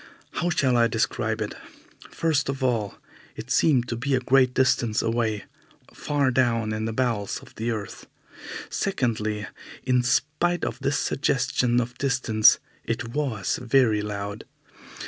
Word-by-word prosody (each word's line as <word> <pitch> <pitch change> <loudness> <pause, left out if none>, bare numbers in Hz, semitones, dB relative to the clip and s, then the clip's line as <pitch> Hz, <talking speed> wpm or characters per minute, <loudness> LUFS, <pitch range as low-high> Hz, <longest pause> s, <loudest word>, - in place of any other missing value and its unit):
How 175 - -1
shall 130 -7 +2
I 115 0 +5
describe - - -1
it? - - -5 0.6
First 150 -4 0
of 135 -1 -3
all, 115 -5 0 0.4
it 125 - -8
seemed 135 -4 +3
to 120 - -1
be 135 +4 0
a - - +2
great 130 0 +3
distance 120 -4 +2
away, 115 -3 0 0.5
far 145 -3 0
down 115 -4 +1
in 110 0 -2
the 115 - -2
bowels 110 -4 -1
of - - -14
the 115 +2 -3
earth. 110 -4 -5 0.6
Secondly, 110 - -1 0.4
in 125 -1 +2
spite 150 +8 0
of - - -4
this 140 0 0
suggestion 125 -3 +1
of 125 +1 -4
distance, 125 -5 +4 0.3
it 115 0 -3
was 120 -7 -1
very 120 -3 +3
loud. 100 0 -5
120 Hz, 145 wpm, -25 LUFS, 110-135 Hz, 0.6 s, I